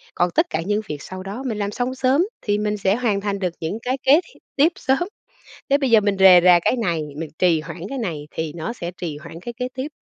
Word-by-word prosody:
còn 175 - +2
tất - - +4
cả 160 - -2
những 210 +2 0
việc 145 -1 -5
sau 185 +3 -8
đó 205 +7 -6
mình 220 -4 -2
làm 205 0 -2
xong 250 +3 -2
sớm 265 +4 +2 0.2
thì 205 -1 0
mình 210 0 -1
sẽ 195 0 +2
hoàn 220 -5 0
thành 200 -1 -2
được 180 -3 -1
những 165 +6 -2
cái 255 +2 -1
kế 290 +6 +6
thi - - -20 0.2
tiếp 300 +5 +4
sớm. 265 +1 +1 0.7
Thế 280 - +5
bây 275 -3 0
giờ 225 - +7
mình 200 -1 +1
rề 185 -2 +8
rà 180 -1 +7
cái - - +2
này, 175 -9 0 0.2
mình 160 -1 -5
trì 170 -4 +3
hoãn 165 +2 -9
cái 275 - -4
này 165 - -4
thì 160 -1 -4
nó 165 +8 -4
sẽ 175 -6 -6
trì 155 -4 -4
hoãn 165 +1 -10
cái 240 +4 -6
kế 250 +1 -2
tiếp. 260 +3 -4
200 Hz, 265 wpm, -22 LUFS, 175-245 Hz, 0.7 s, rề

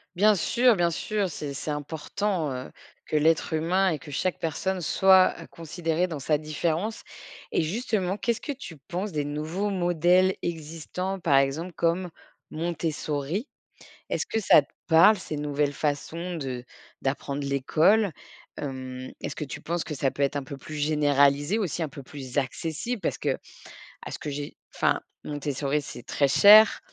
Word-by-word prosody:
Bien 210 +4 +5
sûr, 240 +6 +3
bien 175 -2 +2
sûr, 205 +3 -1
c'est 145 -2 -5
c'est 145 +2 -4
important, 160 +3 -2
heu, 130 0 -5 0.4
que - - -3
l'être 160 +2 +2
humain 180 +4 +2
et 160 - -1
que 150 - -11
chaque 185 +6 -1
personne 185 +4 -2
soit 190 +3 +6
à - - -6
considérer 165 +1 -2
dans 160 -5 -5
sa 150 +2 +1
différence, 160 +7 -2 0.5
et - - +3
justement, 195 +1 -1
qu'est-ce 235 +1 -1
que - - -4
tu 250 -11 -8
penses 190 +2 -3
des 150 -1 0
nouveaux 155 +8 -2
modèles 180 0 +3
existants, 170 +3 -4
par 145 -5 +4
exemple 140 +6 +1
comme 170 +2 0 0.4
Montessori? 160 - -2 0.6
Est-ce - - -1
que 225 - -1
ça 185 -7 +6
te 140 - -19 0.2
parle 175 +6 +7
ces 185 -5 -6
nouvelles 145 -1 -1
façons 160 +5 -2
de 130 -5 -4 0.4
d'apprendre 140 +1 -2
l'école? 155 +9 +3 0.4
Hem, 130 -2 -6
est-ce - - -5
que - - -4
tu 150 +2 -7
penses 170 +2 -2
que 150 - -5
ça 135 0 0
peut - - -6
être 140 +1 0
un 140 - -3
peu 140 +1 -7
plus 145 +3 -9
généralisé 145 +2 +3
aussi, 175 -4 -1
un 155 - -3
peu 140 - -10
plus 130 -1 -8
accessible? 160 - -2
Parce - - -1
qu'à - - -1 0.7
ce - - -5
que 150 - -5
j'ai 145 0 -5 0.2
enfin, - - +1 0.2
Montessori, 145 0 -1
c'est 120 -3 -9
très 140 - +1
cher, 215 +7 +8
160 Hz, 165 wpm, -26 LUFS, 145-185 Hz, 0.7 s, cher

